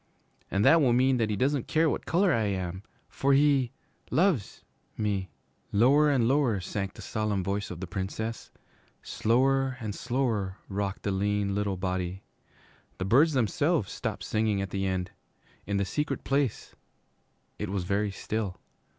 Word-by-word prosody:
And 100 +2 +1
that 160 +4 +7
will 125 -4 +4
mean 130 +1 +3
that 115 -2 +1
he 105 - 0
doesn't 135 +4 0
care 160 +1 +3
what - - -2
color 180 +1 +3
I 115 -2 +1
am, 95 -2 -3 0.3
for 140 +1 +1
he 135 -3 +3 0.4
loves 165 - +1 0.3
me.' 100 -4 -1 0.4
Lower 140 +8 +5
and 130 -5 +3
lower 130 -6 +2
sank 100 +2 -4
the - - -10
solemn 105 -3 -1
voice 100 +1 -2
of 90 - -7
the 95 - -4
Princess. 100 +5 -4 0.5
Slower 130 +3 +1
and 110 -2 -4
slower 115 -6 -1
rocked 100 0 -3
the 100 - 0
little 100 0 0
lean 95 - -6
body. 90 0 -3 0.7
The 95 - -3
birds 145 +10 +4
themselves 120 -8 +1
stopped - - -4
singing 110 -2 0
at 100 -1 -3
the 95 0 -1
end. 95 -1 -2 0.6
In 100 0 0
the 100 - +1
Secret 150 +10 -2
Place 135 -4 -1 0.9
it 105 - -3
was 95 -2 -2
very 100 +3 0
still. 100 -1 -4
105 Hz, 160 wpm, -28 LUFS, 95-130 Hz, 0.9 s, that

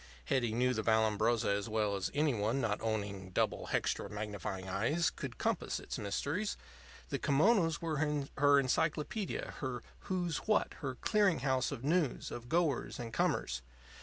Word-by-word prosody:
Hetty 120 - +1
knew 125 +3 +2
the 110 - -1
Vallambrosa 110 +1 +2
as 100 +2 0
well 105 -2 +1
as 95 -2 -1
any 150 -1 +3
one 110 +4 0
not 110 -5 0
owning 100 -4 -2
"double 90 - 0
hextra - - 0
magnifying 105 -2 -4
eyes" 120 - +1
could - - -6
compass - - -1
its - - -5
mysteries. 145 - -2 0.5
The - - -2
kimonos 165 +2 +3
were 160 -2 -1 0.4
her 145 0 +6
encyclopedia, 155 - -1
her 125 -3 -3 0.3
"Who's 175 -4 0
What?" 215 - +2
her 130 -3 -3
clearinghouse 150 - +2
of 135 -3 -5
news, 155 -1 +1
of 120 0 -7
goers 165 -6 +1
and 115 -2 -6
comers. 65 - 0
125 Hz, 150 wpm, -34 LUFS, 110-155 Hz, 0.5 s, her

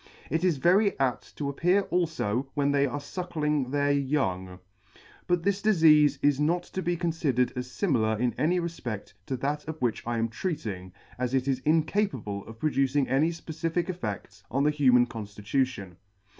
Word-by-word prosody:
It 160 +2 0
is 175 -5 +2
very 190 +5 +3
apt 130 -3 -2
to 145 - -2
appear 180 +8 +2
alfo 155 -9 0
when 145 -1 +2
they 140 0 +3
are 130 - -3
fuckling 150 -3 -2
their 145 +1 +1
young. 130 -11 -1 0.7
But 175 -1 +1
this 200 +1 0
difeafe 160 -8 +5
is 145 -1 +3
not 170 +4 +1
to 190 - -5
be 175 -1 -1
confidered 150 -8 0
as 125 0 -4
fimilar 120 - 0
in 125 0 +1
any 175 +4 +1
refpe6l 125 - -5
to 130 - -2
that 145 +4 -2
of 160 0 -5
which 120 -3 0
I 120 0 -1
am 115 0 0
treating, 110 - -4 0.3
as 125 +1 0
it 130 0 0
is 135 -2 +1
incapable 150 - 0
of 110 - -10
producing 135 0 +1
any 145 +5 +3
fpecific 165 +2 -3
effe£ts 105 - -6
on 135 +3 0
the 150 - +3
human 130 -5 +4
Con 110 -4 -7
llitution. 105 -2 -2
140 Hz, 170 wpm, -27 LUFS, 125-165 Hz, 0.7 s, difeafe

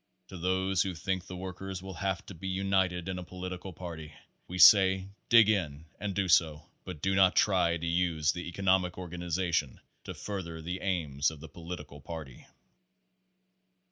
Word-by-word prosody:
To 95 - -8
those 95 +1 +1
who 95 -2 -1
think 95 +2 -3
the 90 - -7
workers 95 0 -6
will 95 0 -7
have 95 +2 -3
to - - -9
be 95 +2 -7
united 95 -2 0
in 95 -1 -3
a - - -6
political 90 +1 -7
party, 80 -4 -8 0.3
we 90 - -6
say 95 0 +7 0.2
dig 115 -2 +7
in 80 -8 0
and 100 -2 -3
do 100 -2 0
so, 80 -3 +3 0.2
but 85 -5 -8
do 95 - +2
not 95 -1 +4
try 90 -4 +3
to 85 - -5
use 85 -3 +1
the 90 0 -6
economic 95 0 +1
organization 85 -4 -2 0.3
to - - -6
further 90 -5 -5
the 90 +3 -5
aims 75 -7 0
of 80 -2 -10
the 80 +1 -10
political 75 -3 -9
party. 75 -5 -9
90 Hz, 170 wpm, -30 LUFS, 85-95 Hz, 0.3 s, say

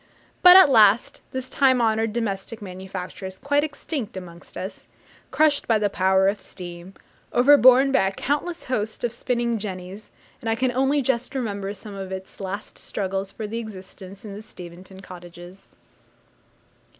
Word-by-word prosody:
But, 360 +1 +10
at 375 -7 +8
last, 215 -2 +4
this 260 0 -4
time 260 -2 +3
honoured 225 -1 +1
domestic 220 -1 -3
manufacture 190 -1 -7
is 190 0 -9
quite 285 +4 +1
extinct 285 - -5
amongst 175 -2 -10
us 190 +1 -7 0.4
crushed 300 -2 +2
by 225 - +4
the 205 -1 0
power 190 0 +3
of 200 0 0
steam, 175 0 -10 0.4
overborne 260 0 +6
by 260 -8 +3
a - - -1
countless 295 - -3
host 220 -4 -3
of 240 -1 -1
spinning 235 -2 -1
jennies, 190 0 -7 0.3
and 225 - -3
I 225 - +2
can 255 +2 0
only 270 +3 +1
just 250 +1 -1
remember 200 -6 -3
some 205 +1 -10
of 195 -1 -7
its 190 0 -8
last 195 +1 -6
struggles 195 0 -3
for 220 - -8
existence 200 -3 -8
in 205 - -7
the 205 - -8
Steventon 185 -2 -12
cottages. 175 0 -13
210 Hz, 155 wpm, -23 LUFS, 190-250 Hz, 0.4 s, But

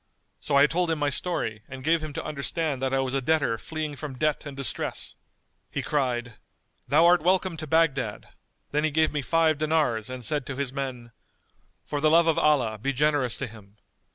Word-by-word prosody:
So - - -2
I 140 +1 +7
told 170 +3 0
him 165 - +1
my 145 -1 0
story 135 -9 -2
and 130 0 -8
gave 165 +2 +2
him 155 -1 -5
to - - -5
understand 150 -1 -2
that 135 0 0
I 135 - +2
was 135 -1 -1
a 135 - +1
debtor 135 -5 +1
fleeing 155 -2 -4
from 140 -2 -7
debt 155 +1 0
and 140 -1 -8
distress. 135 -6 -3 0.5
He - - -3
cried, 125 -5 -1 0.5
'Thou 155 +4 +5
art 175 -1 +6
welcome 185 +1 +2
to 155 0 -5
Baghdad'; 135 -9 +1 0.4
then 150 +1 +1
he 155 - +2
gave 155 +1 +2
me 150 - -1
five 160 +1 +2
dinars 150 -8 +1
and 130 -2 -6
said 145 -1 -1
to 140 - -4
his 135 -1 -2
men, 130 -4 -5 0.7
'For 145 -1 -3
the 155 - +4
love 165 +2 +5
of 165 -1 +2
Allah 125 -8 +2
be 135 +5 -1
generous 145 -3 +1
to 135 - -3
him. 105 -3 -14
145 Hz, 205 wpm, -26 LUFS, 130-155 Hz, 0.7 s, I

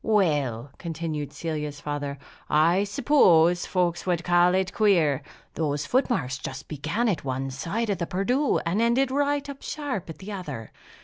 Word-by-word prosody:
"Well," 145 - +1
continued 160 -3 -4
Celia's 150 -3 -4
father, 145 -1 -4 0.3
"I 170 +6 +4
suppose 180 - +4
folks 175 -2 0
would 175 -2 +1
call 175 +1 +4
it 190 -1 0
queer! 170 -10 +3 0.3
Those 145 -2 -1
foot 260 +2 +1
marks 130 - -1
just 135 0 -7
began 160 - -1
at 190 -9 0
one 135 0 -3
side 205 - -2
of 195 - -2
the 170 - -2
Perdu, 245 +10 +1
and 180 +6 +1
ended 250 +3 +2
right 285 +1 0
up 280 -1 -8
sharp 280 - -4
at 160 - -7
the 195 +2 -8
other. 145 - -6
175 Hz, 165 wpm, -26 LUFS, 150-215 Hz, 0.3 s, I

